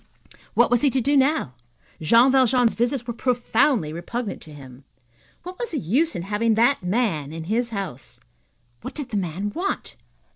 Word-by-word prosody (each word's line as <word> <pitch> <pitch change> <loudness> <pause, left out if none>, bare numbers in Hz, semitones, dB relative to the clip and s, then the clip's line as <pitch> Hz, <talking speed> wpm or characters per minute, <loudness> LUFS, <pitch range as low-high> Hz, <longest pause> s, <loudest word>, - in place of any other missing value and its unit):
What - - +4
was 245 -1 +3
he 285 - +4
to 265 - 0
do 280 +4 +1
now? 275 - +2 0.5
Jean 230 - +5
Valjean's 250 -2 +3
visits 245 +1 -1
were 235 - -4
profoundly 240 - +1
repugnant 205 +6 -5
to 155 - -12
him. 135 -2 -13 0.6
What 365 +1 -9
was 480 -2 -3
the 320 - -3
use 280 - +1
in 170 - -4
having 215 +3 +1
that 240 +5 +3
man 180 - -1
in 165 0 -6
his 230 +7 -1
house? 190 - -6 0.6
What - - -8
did 290 -4 -4
the 210 - -2
man 190 +2 -3
want? 375 +4 -3
230 Hz, 175 wpm, -23 LUFS, 175-265 Hz, 0.6 s, Jean